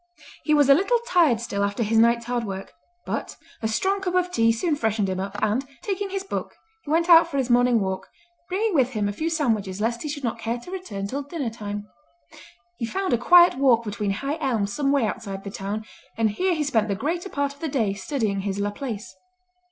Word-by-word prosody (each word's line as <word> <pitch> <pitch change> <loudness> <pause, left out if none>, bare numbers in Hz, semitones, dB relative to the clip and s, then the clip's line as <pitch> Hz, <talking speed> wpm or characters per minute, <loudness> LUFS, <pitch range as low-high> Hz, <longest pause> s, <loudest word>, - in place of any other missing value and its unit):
He 305 - +4
was 290 -2 +5
a 280 - +8
little 395 - +3
tired 330 - +4
still 200 -4 -2
after 200 +4 0
his 220 +1 +2
night's 235 +1 +4
hard 240 0 -1
work, 195 -2 -6 0.3
but - - -4 0.3
a 220 - 0
strong 380 - 0
cup 365 -1 -2
of 360 0 +1
tea 230 -6 +3
soon 295 +8 0
freshened 220 -6 0
him 185 -1 -2
up 195 +1 -4
and, 215 +5 +1 0.2
taking 395 0 -2
his 385 0 -3
book, 390 - -5 0.3
he - - -10
went 330 +2 +2
out 335 -1 +8
for 280 - -4
his 255 -2 0
morning 245 -1 +4
walk, 190 -2 -3 0.4
bringing 410 +3 0
with 265 -4 +2
him 210 -2 0
a 205 - -2
few 315 +10 -2
sandwiches 220 - 0
lest 235 +2 -1
he 300 - -4
should 285 -1 -5
not 235 - -2
care 230 +1 -2
to 245 +9 -11
return 285 - -5
till 270 +8 -3
dinner 285 -4 -4
time. 205 -2 -6 0.9
He 235 - -1
found 380 +2 -1
a - - +4
quiet 350 +2 +6
walk 245 -4 +4
between 210 -1 -3
high 280 +9 -3
elms 220 -8 0
some 280 -2 +1
way 280 -5 +3
outside 200 -3 -5
the 200 - -6
town, 205 +3 -4 0.3
and 225 -2 +2
here 365 - 0
he 310 - 0
spent 225 -7 +1
the 200 - -1
greater 340 - -2
part 280 -3 -1
of 285 - -22
the 320 - -3
day 225 -8 0
studying 215 -2 -2
his 195 0 -3
Laplace. 210 +2 -4
240 Hz, 225 wpm, -24 LUFS, 210-310 Hz, 0.9 s, a